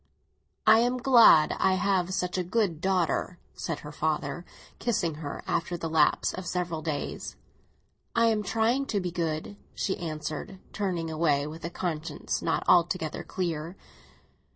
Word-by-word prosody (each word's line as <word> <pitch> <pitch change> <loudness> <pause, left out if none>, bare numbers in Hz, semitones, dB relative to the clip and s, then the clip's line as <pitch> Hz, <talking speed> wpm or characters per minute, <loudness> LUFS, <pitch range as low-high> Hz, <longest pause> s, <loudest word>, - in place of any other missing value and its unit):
"I 220 +1 +7
am 245 +2 +2
glad 235 - +6
I 190 - +3
have 185 -2 +1
such 180 -1 -1
a 185 - 0
good 180 -4 0
daughter," 185 -1 0 0.2
said 165 - -4
her 150 - -8
father, 155 +3 -2 0.3
kissing 180 -9 0
her, 145 -2 -6
after 175 +1 -1
the 165 -1 -4
lapse 155 -2 +3
of 185 -1 -6
several 175 -3 -2
days. 155 -2 -4 0.8
"I 230 0 +4
am 220 -2 +2
trying 225 +6 +1
to 210 - 0
be 180 -2 -3
good," 165 +3 -3 0.2
she 190 - -1
answered, 155 +2 -5 0.2
turning 175 -6 -2
away, 150 -3 +1
with 160 +2 -8
a - - -2
conscience 165 -3 -3
not - - 0
altogether 175 -2 +2
clear. 170 -2 -3
175 Hz, 150 wpm, -28 LUFS, 160-195 Hz, 0.8 s, I